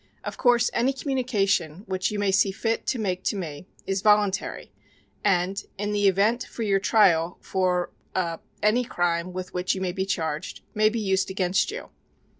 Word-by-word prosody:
Of -, -, -5 dB
course 245 Hz, -1 st, +3 dB
any 250 Hz, +3 st, +2 dB
communication 205 Hz, -, 0 dB
which 185 Hz, -1 st, -1 dB
you 210 Hz, -, -3 dB
may 205 Hz, -1 st, +1 dB
see 195 Hz, +1 st, +3 dB
fit 225 Hz, +3 st, -2 dB
to 260 Hz, -, +1 dB
make 185 Hz, -5 st, -1 dB
to -, -, +1 dB
me 165 Hz, -3 st, -6 dB, 0.2 s
is 195 Hz, 0 st, -1 dB
voluntary 210 Hz, -2 st, +2 dB, 0.5 s
and, 195 Hz, 0 st, +1 dB
in 205 Hz, +1 st, -2 dB
the 205 Hz, -1 st, +2 dB
event 205 Hz, +6 st, +2 dB
for 230 Hz, -, -6 dB
your 200 Hz, -2 st, +2 dB
trial 180 Hz, -5 st, +3 dB
for 180 Hz, -2 st, 0 dB, 0.2 s
er 170 Hz, -3 st, -1 dB, 0.2 s
any 220 Hz, +4 st, +3 dB
crime 175 Hz, -5 st, -1 dB
with 180 Hz, 0 st, -6 dB
which 180 Hz, +1 st, 0 dB
you -, -, -4 dB
may 185 Hz, -1 st, 0 dB
be 190 Hz, +1 st, -3 dB
charged, 160 Hz, -3 st, -3 dB
may 215 Hz, -1 st, +4 dB
be 230 Hz, +1 st, -2 dB
used 190 Hz, -2 st, +1 dB
against 185 Hz, -1 st, +1 dB
you." 470 Hz, +4 st, -6 dB
195 Hz, 180 wpm, -25 LUFS, 180-215 Hz, 0.5 s, may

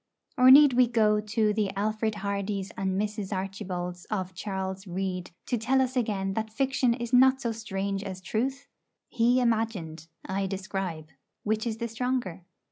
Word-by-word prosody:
Or 255 Hz, -1 st, +6 dB
need 280 Hz, 0 st, +9 dB
we 250 Hz, 0 st, +5 dB
go 215 Hz, -3 st, +3 dB
to 210 Hz, 0 st, +1 dB
the 210 Hz, -2 st, 0 dB
Alfred 215 Hz, +1 st, -1 dB
Hardys 200 Hz, 0 st, -2 dB
and 190 Hz, 0 st, -1 dB
Mrs. 210 Hz, -1 st, -3 dB
Archbolds 185 Hz, -2 st, -4 dB
of 185 Hz, -3 st, -3 dB
Charles 190 Hz, 0 st, -4 dB
Reade 185 Hz, 0 st, -3 dB, 0.2 s
to 245 Hz, -, -1 dB
tell 260 Hz, +4 st, +2 dB
us 260 Hz, 0 st, 0 dB
again 200 Hz, -5 st, -1 dB
that 220 Hz, +1 st, -3 dB
fiction 260 Hz, 0 st, +1 dB
is 235 Hz, 0 st, -6 dB
not 260 Hz, +1 st, +6 dB
so 240 Hz, -3 st, -2 dB
strange 200 Hz, -3 st, -3 dB
as 190 Hz, -2 st, -6 dB
truth? 265 Hz, +9 st, -2 dB, 0.4 s
He 245 Hz, +1 st, +3 dB
imagined; 215 Hz, -10 st, -1 dB, 0.2 s
I 195 Hz, +1 st, -1 dB
describe. 190 Hz, -5 st, -4 dB, 0.3 s
Which 220 Hz, +2 st, 0 dB
is 225 Hz, -1 st, -2 dB
the 235 Hz, 0 st, -3 dB
stronger? 235 Hz, -6 st, -2 dB
210 Hz, 160 wpm, -28 LUFS, 190-235 Hz, 0.4 s, need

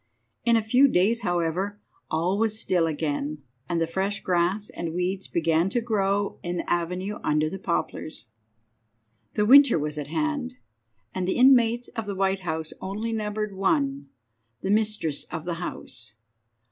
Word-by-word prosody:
In 235 Hz, -1 st, +5 dB
a 225 Hz, -, 0 dB
few 250 Hz, +6 st, +5 dB
days, 225 Hz, +2 st, +2 dB
however, 175 Hz, +3 st, -1 dB, 0.3 s
all 175 Hz, +5 st, 0 dB
was 220 Hz, -1 st, +1 dB
still 175 Hz, -6 st, +1 dB
again, 150 Hz, -1 st, -2 dB, 0.3 s
and 165 Hz, -1 st, +1 dB
fresh 195 Hz, +4 st, -2 dB
grass 185 Hz, +4 st, 0 dB
and 165 Hz, -1 st, -5 dB
weeds 185 Hz, +2 st, -2 dB
began 165 Hz, +1 st, +1 dB
to 240 Hz, -, 0 dB
grow 205 Hz, -3 st, 0 dB
in 175 Hz, 0 st, -3 dB
the -, -, -4 dB
avenue 180 Hz, +4 st, -1 dB
under 155 Hz, +1 st, +1 dB
the 195 Hz, -, -5 dB
poplars. 170 Hz, -3 st, -3 dB
V. -, -, -28 dB, 1.1 s
The 210 Hz, -, +2 dB
winter 275 Hz, -2 st, +8 dB
was 150 Hz, 0 st, -2 dB
at 145 Hz, -, -5 dB
hand, 280 Hz, -, -2 dB, 0.6 s
and 185 Hz, -1 st, -2 dB
the -, -, 0 dB
inmates 245 Hz, -2 st, +5 dB
of 225 Hz, -3 st, -5 dB
the 200 Hz, -, -3 dB
White 195 Hz, 0 st, +1 dB
House 160 Hz, -3 st, -4 dB
only 215 Hz, +4 st, -3 dB
numbered 210 Hz, -1 st, -3 dB
one 155 Hz, -8 st, +2 dB
more—the 120 Hz, -, -9 dB
mistress 210 Hz, -8 st, +1 dB
of 160 Hz, -1 st, -6 dB
the 175 Hz, -, -2 dB
house. 110 Hz, -10 st, -6 dB
185 Hz, 160 wpm, -26 LUFS, 160-215 Hz, 1.1 s, winter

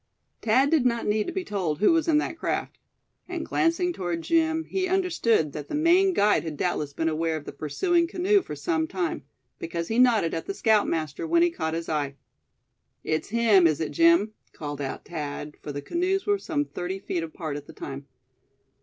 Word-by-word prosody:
Thad 260 Hz, +6 st, +3 dB
did 315 Hz, -5 st, +4 dB
not 235 Hz, -2 st, +1 dB
need 210 Hz, 0 st, +1 dB
to -, -, -2 dB
be 380 Hz, -, -3 dB
told 180 Hz, -, -2 dB
who 210 Hz, -, +4 dB
was 330 Hz, 0 st, +2 dB
in 315 Hz, -2 st, +4 dB
that 315 Hz, -, -1 dB
craft. 330 Hz, -, -3 dB, 0.5 s
And -, -, -4 dB
glancing 350 Hz, +1 st, +1 dB
toward 175 Hz, -, -3 dB
Jim, 320 Hz, -, +2 dB
he 370 Hz, +2 st, -2 dB
understood 335 Hz, -, +1 dB
that 150 Hz, -1 st, -7 dB
the -, -, -4 dB
Maine 350 Hz, +5 st, +4 dB
guide 210 Hz, -8 st, +3 dB
had 160 Hz, -3 st, -5 dB
doubtless 150 Hz, -4 st, -1 dB
been 160 Hz, +3 st, -2 dB
aware 160 Hz, 0 st, 0 dB
of 145 Hz, -, -9 dB
the -, -, -6 dB
pursuing 335 Hz, -, 0 dB
canoe 385 Hz, +3 st, +2 dB
for 150 Hz, -, -7 dB
some 160 Hz, +2 st, -1 dB
time; 170 Hz, -7 st, -3 dB, 0.3 s
because 170 Hz, 0 st, -4 dB
he 225 Hz, +2 st, +1 dB
nodded 230 Hz, -9 st, +4 dB
at 165 Hz, -, -4 dB
the 395 Hz, -, -3 dB
scoutmaster 205 Hz, -, +1 dB
when 335 Hz, +1 st, +4 dB
he 345 Hz, -, +3 dB
caught 160 Hz, -, -3 dB
his 165 Hz, 0 st, -4 dB
eye. 145 Hz, -3 st, -2 dB, 0.9 s
"It's 155 Hz, 0 st, -2 dB
him, 215 Hz, -5 st, +5 dB
is 155 Hz, -2 st, 0 dB
it, 160 Hz, -, -2 dB
Jim?" 335 Hz, -10 st, +4 dB, 0.2 s
called 145 Hz, -2 st, -6 dB
out 135 Hz, -, -5 dB
Thad; 150 Hz, -2 st, -5 dB
for 145 Hz, -, -6 dB
the 145 Hz, 0 st, -6 dB
canoes 370 Hz, -, 0 dB
were 410 Hz, -1 st, +2 dB
some 295 Hz, -6 st, -1 dB
thirty 180 Hz, -4 st, -4 dB
feet 185 Hz, -3 st, -3 dB
apart 160 Hz, -2 st, -5 dB
at 145 Hz, 0 st, -7 dB
the -, -, -11 dB
time. 140 Hz, 0 st, -7 dB
205 Hz, 200 wpm, -26 LUFS, -, 0.9 s, him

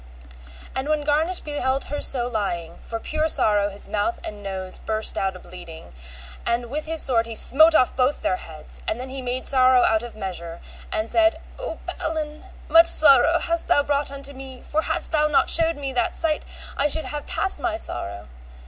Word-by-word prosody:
And 265 Hz, +3 st, -3 dB
when 305 Hz, -1 st, 0 dB
Garnish 310 Hz, +5 st, 0 dB
beheld 275 Hz, -3 st, -2 dB
her 290 Hz, +1 st, -5 dB
so 245 Hz, -3 st, +2 dB
lying, 185 Hz, -8 st, -4 dB
for 225 Hz, -, -6 dB
pure 310 Hz, +6 st, -2 dB
sorrow 205 Hz, -8 st, +2 dB
his 200 Hz, 0 st, -4 dB
mouth 210 Hz, +12 st, -2 dB
and 210 Hz, -1 st, -7 dB
nose 190 Hz, -2 st, -6 dB
burst 220 Hz, 0 st, -2 dB
out 190 Hz, -1 st, -2 dB
a -, -, -10 dB
bleeding, 175 Hz, -, -12 dB, 0.5 s
and 235 Hz, 0 st, -2 dB
with 305 Hz, +2 st, -4 dB
his 320 Hz, 0 st, +3 dB
sword 230 Hz, -3 st, +2 dB
he 230 Hz, -, -7 dB
smote 315 Hz, +8 st, +6 dB
off 255 Hz, -, +3 dB
both 260 Hz, +3 st, 0 dB
their 185 Hz, -, 0 dB
heads, 155 Hz, -3 st, -10 dB
and 220 Hz, -, -2 dB
then 255 Hz, +1 st, -7 dB
he 265 Hz, 0 st, -6 dB
made 255 Hz, +1 st, -4 dB
sorrow 255 Hz, -1 st, +5 dB
out 220 Hz, -1 st, +2 dB
of 240 Hz, -1 st, -9 dB
measure, 170 Hz, -5 st, -6 dB, 0.3 s
and 215 Hz, +1 st, -1 dB
said, 335 Hz, -1 st, +2 dB, 0.2 s
O -, -, -5 dB
Balin, 310 Hz, -1 st, -4 dB, 0.2 s
much 330 Hz, +2 st, +6 dB
sorrow 300 Hz, +2 st, +7 dB
hast 335 Hz, -1 st, -2 dB
thou 290 Hz, -5 st, +3 dB
brought 285 Hz, 0 st, -1 dB
unto 280 Hz, 0 st, -3 dB
me, 265 Hz, -1 st, -10 dB
for 310 Hz, -, -1 dB
hadst -, -, -2 dB
thou 305 Hz, -2 st, +2 dB
not 295 Hz, -, +2 dB
shewed 330 Hz, -1 st, +4 dB
me 275 Hz, -2 st, -5 dB
that 240 Hz, -2 st, -1 dB
sight 315 Hz, -2 st, -1 dB, 0.3 s
I 285 Hz, -, +1 dB
should 315 Hz, +2 st, +1 dB
have 295 Hz, -1 st, -6 dB
passed 385 Hz, -, -1 dB
my 335 Hz, -2 st, -2 dB
sorrow. 100 Hz, -, -4 dB
265 Hz, 195 wpm, -23 LUFS, 215-305 Hz, 0.5 s, sorrow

